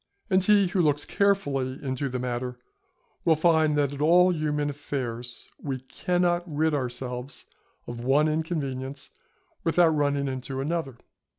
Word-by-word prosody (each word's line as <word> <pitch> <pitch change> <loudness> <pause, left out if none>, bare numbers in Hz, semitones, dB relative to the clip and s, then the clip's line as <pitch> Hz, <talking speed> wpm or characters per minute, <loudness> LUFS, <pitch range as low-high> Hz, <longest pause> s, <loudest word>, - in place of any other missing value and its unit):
And 185 0 +4
he 205 -1 +5
who 180 0 +1
looks 145 -2 +1
carefully 145 -10 +1
into 135 +1 -2
the 130 - -3
matter 125 0 -3 0.7
will 160 - +4
find, 155 -2 +3
that 145 -1 +1
in 140 - -6
all 180 +4 +5
human 150 -2 -1
affairs, 125 -5 -5
we 135 -3 -3
cannot 175 +5 0
rid 155 +1 +1
ourselves 125 -1 -4 0.4
of 120 0 -7
one 140 +4 +3
inconvenience 140 -4 -3 0.5
without 170 0 +4
running 145 -2 +1
into 130 0 -4
another. 145 -3 -2
145 Hz, 135 wpm, -26 LUFS, 130-160 Hz, 0.7 s, he